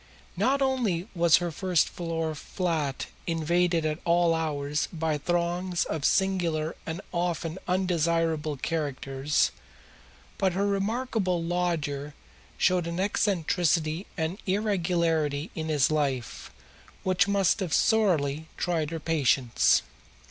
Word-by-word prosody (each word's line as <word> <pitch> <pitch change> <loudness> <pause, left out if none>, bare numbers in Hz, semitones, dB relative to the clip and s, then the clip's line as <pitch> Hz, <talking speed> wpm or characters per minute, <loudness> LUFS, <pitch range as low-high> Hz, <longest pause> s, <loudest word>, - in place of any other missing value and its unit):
Not 275 +1 +2
only 230 -9 0
was 170 -2 +5
her 175 -1 -2
first 180 0 +1
floor 165 -2 -3
flat 155 -3 -2 0.2
invaded 170 0 +1
at 155 +1 -1
all 170 0 +3
hours 150 -2 -1
by 160 -3 -1
throngs 175 +2 0
of 155 -3 -3
singular 170 -5 +1
and 165 +3 -4
often 170 -1 -2
undesirable 165 -4 +1
characters 140 -2 -1 0.9
but 190 -2 +2
her 195 +3 0
remarkable 200 -3 0
lodger 160 -5 -2 0.4
showed 180 -2 +2
an 170 +1 -3
eccentricity 175 -3 +1
and 165 +4 -2
irregularity 170 -7 0
in 160 -1 -4
his 150 -1 +3
life 140 -6 -2 0.5
which 185 +1 +2
must 200 0 +2
have 185 -5 -3
sorely 160 - +2
tried 165 -4 0
her 165 0 -4
patience. 140 -6 +2
170 Hz, 110 wpm, -27 LUFS, 155-185 Hz, 0.9 s, was